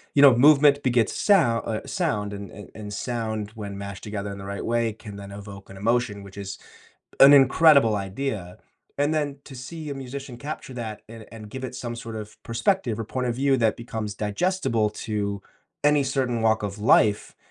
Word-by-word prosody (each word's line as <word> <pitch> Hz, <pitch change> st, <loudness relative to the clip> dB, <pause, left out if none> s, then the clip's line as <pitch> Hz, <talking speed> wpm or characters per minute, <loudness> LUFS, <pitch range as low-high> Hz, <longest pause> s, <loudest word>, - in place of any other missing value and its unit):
You 140 Hz, -, +6 dB
know, 135 Hz, -4 st, +9 dB
movement 145 Hz, +2 st, +6 dB
begets 120 Hz, -4 st, +2 dB
sou 205 Hz, -, +4 dB
uh, 115 Hz, -, 0 dB
sound 105 Hz, -, -2 dB
and 100 Hz, -1 st, -7 dB
and 105 Hz, -3 st, -11 dB
and 105 Hz, -1 st, -8 dB
sound, 110 Hz, -2 st, -3 dB
when 100 Hz, -2 st, -6 dB
mashed 100 Hz, -1 st, -7 dB
together 100 Hz, -1 st, -4 dB
in 100 Hz, -, -8 dB
the 95 Hz, -, -8 dB
right 100 Hz, 0 st, -5 dB
way, 115 Hz, -1 st, 0 dB
can 105 Hz, -2 st, -11 dB
then 100 Hz, 0 st, -9 dB
evoke 100 Hz, -1 st, -10 dB
an 95 Hz, -, -11 dB
emotion, 110 Hz, -1 st, 0 dB
which 100 Hz, 0 st, -13 dB
is 95 Hz, -1 st, -6 dB, 0.6 s
an 135 Hz, +1 st, +10 dB
incredible 140 Hz, -4 st, +6 dB
idea, 100 Hz, -2 st, -4 dB, 0.4 s
and 145 Hz, +2 st, +1 dB
then 145 Hz, -2 st, -1 dB
to 135 Hz, -, -11 dB
see 150 Hz, +5 st, -7 dB
a -, -, -3 dB
musician 135 Hz, -1 st, -7 dB
capture 145 Hz, -2 st, -7 dB
that 110 Hz, -3 st, -6 dB
and 115 Hz, -1 st, -11 dB
and 110 Hz, -2 st, -10 dB
give 130 Hz, 0 st, -6 dB
it 125 Hz, 0 st, -5 dB
some 120 Hz, -1 st, -5 dB
sort 115 Hz, -1 st, -7 dB
of 105 Hz, -1 st, -9 dB
perspective 120 Hz, -, 0 dB
or -, -, -2 dB
point 125 Hz, +2 st, -3 dB
of 120 Hz, -, -1 dB
view 135 Hz, +1 st, +2 dB
that 110 Hz, -2 st, +1 dB
becomes 110 Hz, -3 st, -5 dB
digestible 115 Hz, -, 0 dB
to 100 Hz, -2 st, -3 dB, 0.4 s
any 145 Hz, -1 st, +4 dB
certain 130 Hz, -3 st, -1 dB
walk 110 Hz, -1 st, +2 dB
of 100 Hz, 0 st, -4 dB
life 105 Hz, 0 st, +3 dB
115 Hz, 195 wpm, -25 LUFS, 105-135 Hz, 0.6 s, an